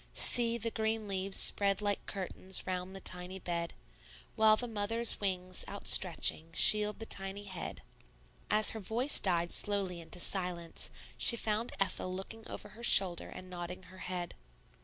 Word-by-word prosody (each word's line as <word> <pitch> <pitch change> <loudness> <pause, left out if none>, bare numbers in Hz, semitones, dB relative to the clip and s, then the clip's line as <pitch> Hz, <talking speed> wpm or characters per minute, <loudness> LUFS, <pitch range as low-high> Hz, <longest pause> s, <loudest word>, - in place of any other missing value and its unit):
See, 235 -1 +4
the 230 0 -4
green 220 -1 -3
leaves 195 0 -2
spread 200 -1 +4
like 205 -1 -3
curtains 190 -1 -2
Round 185 +1 -5
the - - -8
tiny 180 +1 -3
bed, 170 -2 -5 0.6
While 215 0 +4
the 245 - -3
mother's 225 +1 +3
wings, 185 -2 -3
outstretching, 170 -4 +4
Shield 210 +4 +5
the 225 - -7
tiny 195 -1 -6
head?" 185 -4 -8 0.7
As 215 0 +4
her 220 - -7
voice 235 +7 +1
died 175 -3 -1
slowly 195 -4 -2
into 170 +2 -6
silence, 175 -2 -3 0.3
she 235 - +2
found 220 +1 -3
Ethel 195 -1 -2
looking 205 +4 -8
over 210 - -9
her 215 +3 -14
shoulder 190 -6 +4
and 185 - -11
nodding 180 0 -8
her 185 +1 -15
head. 180 -2 -6
195 Hz, 155 wpm, -31 LUFS, 180-215 Hz, 0.7 s, Shield